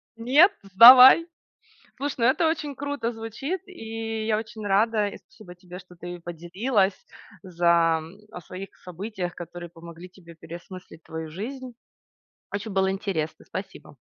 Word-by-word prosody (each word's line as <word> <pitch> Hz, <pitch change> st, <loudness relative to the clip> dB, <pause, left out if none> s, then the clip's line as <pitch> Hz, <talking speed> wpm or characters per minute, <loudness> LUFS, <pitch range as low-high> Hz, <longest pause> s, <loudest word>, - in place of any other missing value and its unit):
"Нет, 275 Hz, -, +4 dB
сдавай". 250 Hz, -, +9 dB, 0.7 s
Слушай, 280 Hz, +1 st, -3 dB
ну, 230 Hz, -, +2 dB
это 265 Hz, +6 st, +3 dB
очень 305 Hz, -3 st, -3 dB
круто 285 Hz, -4 st, -4 dB
звучит, 235 Hz, -, -5 dB
и 225 Hz, -8 st, -6 dB
я 215 Hz, -1 st, +1 dB
очень 220 Hz, -1 st, -7 dB
рада, 210 Hz, +1 st, +2 dB
и -, -, -8 dB
спасибо 180 Hz, -5 st, -16 dB
тебе, 180 Hz, +1 st, -12 dB
что 180 Hz, -1 st, -17 dB
ты 175 Hz, 0 st, -8 dB
поделилась. 190 Hz, +5 st, -1 dB, 0.5 s
За, 170 Hz, -2 st, +2 dB
м, 165 Hz, +5 st, -12 dB
о -, -, -8 dB
своих 190 Hz, +4 st, -10 dB
событиях, 180 Hz, 0 st, -6 dB
которые 175 Hz, 0 st, -9 dB
помогли 170 Hz, +1 st, -12 dB
тебе 170 Hz, -3 st, -16 dB
переосмыслить 175 Hz, +1 st, -12 dB
твою 160 Hz, -1 st, -7 dB
жизнь. 250 Hz, -, -7 dB, 0.8 s
Очень 205 Hz, +1 st, -5 dB
было 190 Hz, 0 st, +1 dB
интересно. 190 Hz, -5 st, -4 dB
Спасибо. 190 Hz, +1 st, -9 dB
195 Hz, 140 wpm, -25 LUFS, 175-230 Hz, 0.8 s, сдавай